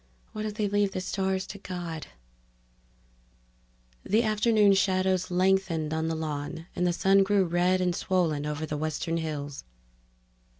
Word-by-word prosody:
Why 215 - -6
don't 215 -1 -4
they 210 -1 0
leave 205 -1 +1
the - - -2
stars 190 0 -1
to 200 - -9
God?_ 175 -5 -6 2.0
The 220 +4 +2
afternoon 215 -1 +4
shadows 185 -1 +1
lengthened 180 -4 +1
on 160 0 -1
the 165 - -1
lawn 155 +1 -4
and 180 - +1
the - - +2
sun 195 +3 +4
grew 195 0 +3
red 175 +2 +2
and 180 -1 +1
swollen 165 -7 0
over 150 +1 -3
the 150 -1 -4
western 155 +2 -2
hills. 145 -3 -4
180 Hz, 145 wpm, -28 LUFS, 160-195 Hz, 2.0 s, afternoon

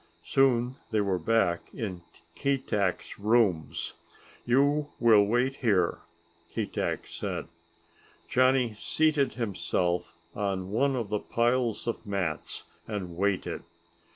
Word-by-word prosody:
Soon 130 -1 +2
they 110 -2 +1
were 100 -3 +1
back 90 -2 +1
in 95 -6 -4 0.3
Keetack's 115 -11 -1
rooms. 105 -6 +1 0.5
"You 145 +4 +3
will 110 -3 +6
wait 125 +4 +1
here," 100 -9 +2 0.5
Keetack - - -2
said. - - -4 0.8
Johnny 130 -1 +3
seated 150 +5 +1
himself 90 -6 -1 0.2
on 95 -2 -2
one 135 +5 +2
of 115 -5 -2
the 105 0 0
piles 120 0 0
of 115 - -3
mats 95 -7 -3 0.2
and 95 -6 -4
waited. 100 +1 -1
110 Hz, 105 wpm, -28 LUFS, 100-130 Hz, 0.8 s, will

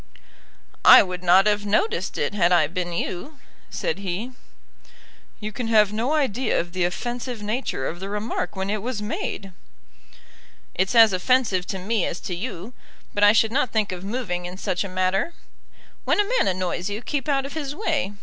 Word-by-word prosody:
"I - - +10
would 180 -2 -6
not 185 +2 +5
have 210 -1 +2
noticed 420 - 0
it, - - -1
had 180 -4 +2
I 170 -3 +5
been 175 +3 -4
you," 180 - -4 0.3
said - - -3
he. 200 +6 -4 1.1
"You 215 0 -5
can 235 +2 -4
have 210 -2 +4
no 235 +7 0
idea 265 -5 +1
of 170 0 -4
the 185 -1 +1
offensive 240 +4 -4
nature 210 - -2
of 175 - -4
the 195 +1 -6
remark 210 +2 -3
when 190 +1 -2
it 215 -1 -2
was 240 0 -3
made." 210 -1 -4 1.2
"It's 190 +6 0
as 225 -3 +7
offensive 195 -2 +1
to 195 - -3
me 200 +2 -1
as 175 - -4
to 180 - -4
you, 195 +2 -6 0.4
but 205 - 0
I 205 - +8
should 220 0 +3
not 260 0 +1
think 215 -3 0
of 180 0 -6
moving 195 -5 -3
in 180 +1 -9
such 185 -1 -1
a 200 - -6
matter. 185 - 0 0.7
When - - +1
a - - +5
man - - +1
annoys 185 0 -2
you, 210 +4 -5
keep 295 0 -3
out 275 -1 +1
of 275 - -7
his 290 -3 -4
way. 310 - -1
205 Hz, 190 wpm, -23 LUFS, 185-245 Hz, 1.2 s, I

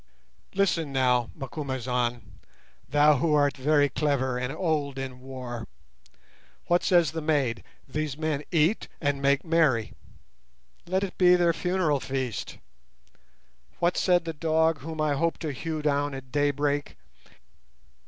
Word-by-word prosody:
Listen 170 -6 +1
now, 125 -3 +2
Macumazahn, 125 -6 -3 0.5
thou 145 +1 +5
who 150 +3 +2
art 145 -3 +3
very 145 +2 +3
clever 135 -2 0
and 125 +1 -2
old 150 -4 -1
in 130 -1 -5
war. 125 -3 -7 1.0
What 175 0 +2
says 175 -5 +4
the 160 0 -4
maid? 145 -7 0 0.2
These 150 0 -3
men 155 -2 -2
eat 165 +5 +2
and 145 -2 -1
make 140 +3 +2
merry; 155 -9 +2 0.9
let 190 +2 0
it 195 - -6
be 180 -1 +7
their 175 -1 +3
funeral 180 -4 0
feast. 130 -4 -4 1.2
What 175 +1 +1
said 175 -2 +2
the 165 - -3
dog 160 0 +1
whom 160 +1 -7
I 155 -1 +2
hope 165 +4 0
to 155 -3 -4
hew 155 +2 -4
down 145 -1 0
at 130 -1 -10
daybreak? 145 0 0
145 Hz, 135 wpm, -27 LUFS, 130-160 Hz, 1.2 s, be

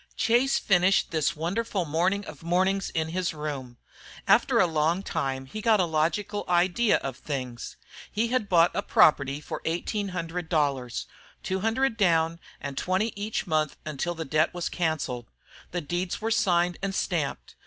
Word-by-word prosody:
Chase 245 +4 +3
finished 190 0 +3
this 155 -3 +1
wonderful 185 +4 -1
morning 180 +6 0
of - - -10
mornings 185 +3 +1
in 160 0 -2
his 175 -1 -2
room. 140 -5 -5 0.5
After - - +4
a - - +6
long 165 +3 +1
time 135 -7 -2
he 215 +11 -7
got 220 -1 +4
a 180 - +3
logical 170 +6 -1
idea 180 +6 +3
of 135 -2 -3
things. 130 -3 -5 0.3
He 225 +3 0
had 245 -5 0
bought 170 -1 +5
a - - 0
property 140 -2 +4
for 150 - -6
eighteen 200 +5 -2
hundred 175 -2 -4
dollars, 140 -7 0 0.4
two 190 0 -1
hundred 225 +4 +1
down 165 -4 +2 0.2
and 140 -1 -4
twenty 190 +5 0
each 205 +2 -3
month 155 -4 0
until 155 +3 -3
the 160 -1 -4
debt 155 +5 +1
was 175 - -2
cancelled. 155 -8 -2 0.4
The 175 - -3
deeds 175 +4 -3
were 225 +1 -2
signed 180 -5 +2
and 195 -1 -2
stamped. 140 - -2
175 Hz, 165 wpm, -27 LUFS, 155-195 Hz, 0.5 s, a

